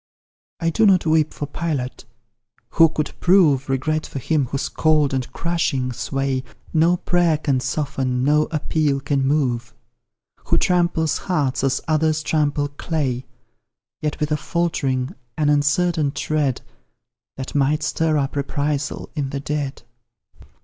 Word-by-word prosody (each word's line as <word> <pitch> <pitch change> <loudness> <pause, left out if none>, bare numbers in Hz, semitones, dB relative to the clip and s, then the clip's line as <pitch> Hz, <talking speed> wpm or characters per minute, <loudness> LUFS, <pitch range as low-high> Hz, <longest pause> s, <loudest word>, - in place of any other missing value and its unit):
I 165 0 +1
do 220 +6 +4
not 185 -4 +4
weep 155 -1 +3
for 145 - -5
Pilate 145 -5 -4 0.6
who 165 -1 +5
could 150 -1 -3
prove 160 -8 +4
Regret 155 +4 0
for - - -7
him 145 0 0
whose 135 +3 -2
cold 155 -3 +2
and 130 -2 -2
crushing 155 -7 -1
sway 135 +1 -2 0.3
No 170 +2 +4
prayer 175 -3 +2
can 140 -4 0
soften, 130 -1 -1
no 150 +2 +3
appeal 150 -2 0
can 140 0 0
move: 125 -5 0 0.7
Who - - +2
tramples 170 -3 +1
hearts 140 -8 -1
as 135 -1 +1
others 155 0 +1
trample 145 -2 +1
clay, 140 -4 -2 0.7
Yet 150 0 -2
with 150 0 -1
a 150 - +2
faltering, 140 -7 -1 0.2
an 150 -2 +2
uncertain 150 +1 +2
tread, 145 -5 -1 0.8
That 130 0 -6
might 145 +2 +1
stir 160 -1 +1
up 140 -1 -1
reprisal 145 0 -2
in 145 -4 -2
the 140 - -3
dead. 145 -2 -3
150 Hz, 135 wpm, -21 LUFS, 135-160 Hz, 0.8 s, who